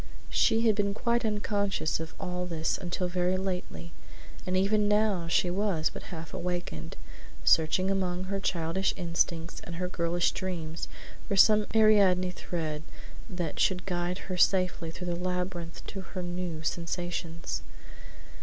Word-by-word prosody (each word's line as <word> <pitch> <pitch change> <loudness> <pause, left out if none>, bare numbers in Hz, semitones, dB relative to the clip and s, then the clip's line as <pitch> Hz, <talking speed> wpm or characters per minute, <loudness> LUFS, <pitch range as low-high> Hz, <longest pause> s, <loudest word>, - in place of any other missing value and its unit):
She 225 -1 +4
had 220 - +6
been 200 -1 0
quite 235 +2 +1
unconscious 205 -6 0
of 160 0 -6
all 180 0 -3
this 160 -2 0
until 180 0 -2
very 180 +1 +1
lately, 180 - -4 0.6
and 185 0 +1
even 205 +2 +3
now 210 -5 +2
she 175 +1 +2
was 185 -5 +1
but - - -7
half 165 -3 -7
awakened; 175 - -4 0.5
searching 165 +4 +4
among 185 -2 0
her 195 +1 -2
childish 180 +1 0
instincts 170 -2 -1
and 170 - -7
her 180 +2 -2
girlish 170 -1 +1
dreams 165 -4 -4 0.4
for 200 - 0
some 210 +1 +6
Ariadne 200 -5 +5
thread 160 -4 -4 0.5
that 175 -5 -3
should 180 -1 +2
guide 175 -1 -1
her 185 -1 -3
safely 180 -3 +3
through 180 +2 -6
the 175 -1 -1
labyrinth 180 -1 -3
of 195 - -4
her 185 -2 -5
new 175 -2 -4
sensations. 170 0 -3
180 Hz, 145 wpm, -29 LUFS, 170-195 Hz, 0.6 s, had